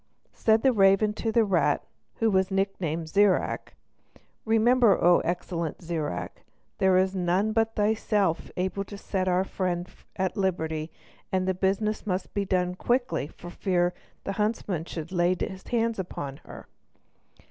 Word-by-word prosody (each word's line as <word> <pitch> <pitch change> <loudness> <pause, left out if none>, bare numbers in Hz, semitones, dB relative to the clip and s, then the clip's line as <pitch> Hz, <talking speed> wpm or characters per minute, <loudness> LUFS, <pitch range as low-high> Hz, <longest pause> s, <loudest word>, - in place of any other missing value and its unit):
Said 220 0 +2
the 265 -1 +4
raven 195 0 +4
to 225 +1 -2
the 230 +1 +4
rat, 170 -7 +2 0.3
who 225 -1 +1
was 190 -1 +2
nicknamed 190 -5 -1
Zirac: 200 +3 +1 0.7
"Remember, 225 0 +4
O 175 0 +5
excellent 170 -2 -3
Zirac, 160 - -4 0.4
there 190 -1 +4
is 190 +1 +2
none 185 +4 +1
but 225 0 +1
thyself 205 -4 +1
able 190 +2 -1
to 200 - -9
set 190 -2 -2
our 180 0 +2
friend 180 -2 -2 0.3
at 190 -1 -1
liberty; 160 -5 -1 0.4
and 185 0 0
the 190 - +2
business 200 +4 -1
must 185 -1 -2
be 200 -1 -1 0.3
quickly 240 - 0
done - - -18
for 175 - -9
fear 180 -2 0 0.3
the - - -3
huntsman 210 -6 -1
should 165 -1 -6
lay 175 0 +2
his 190 0 -5
hands 230 -2 0
upon 140 -7 -5
her." - - -10
190 Hz, 145 wpm, -27 LUFS, 175-210 Hz, 0.7 s, O